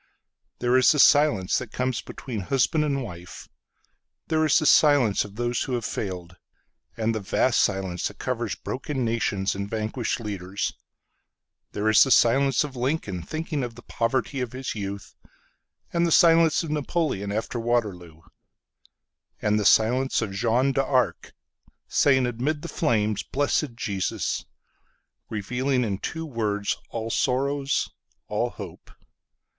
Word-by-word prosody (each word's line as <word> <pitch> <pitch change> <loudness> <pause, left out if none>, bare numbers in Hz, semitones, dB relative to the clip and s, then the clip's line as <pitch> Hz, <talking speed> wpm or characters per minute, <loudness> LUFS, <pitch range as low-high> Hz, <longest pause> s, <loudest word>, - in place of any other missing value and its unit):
There 125 +1 +2
is 130 - +6
the 150 - +1
silence 145 -10 +4
that 125 -4 -8
comes 125 -2 -1
between 120 -5 -6
husband 135 - +1
and 140 -3 -1
wife. 90 -5 -9 0.8
There 160 -1 +2
is 150 - +4
the 155 - +1
silence 145 -9 +5
of 105 -1 -11
those 120 0 -1
who 130 - -2
have 120 -3 -3
failed; 90 -3 -5 0.6
And 115 0 0
the 110 - -2
vast 110 +5 +1
silence 95 -3 0
that - - -10
coversBroken 125 +4 -4
nations 115 -6 0
and 100 +1 -5
vanquished 110 +2 -2
leaders. 100 -3 -4 1.0
There 105 +1 -1
is 110 - +7
the 135 - -1
silence 135 +3 +4
of 145 -3 -7
Lincoln, 125 - -2
Thinking 155 - -4
of 120 -2 -5
the 120 - -13
poverty 130 +3 -1
of 125 -1 -4
his 130 0 -4
youth. 100 -1 -6 0.8
And 170 0 +2
the - - -1
silence 165 -1 +5
of 160 - -5
NapoleonAfter 120 - -2
Waterloo.And 105 0 -5
the 105 - -1
silence 125 +6 +3
of 105 - -4
Jeanne 120 +6 +2
d'ArcSaying 130 0 0
amid 135 +6 -2
the - - -4
flames, 110 - 0
"Blessed 140 -2 -1
Jesus"—Revealing 125 +4 -4
in 100 -4 -2
two 165 0 -4
words 105 -7 -1
all 115 0 -4
sorrows, 140 +3 0 0.4
all - - -1
hope. - - -10
120 Hz, 130 wpm, -25 LUFS, 105-140 Hz, 1.0 s, is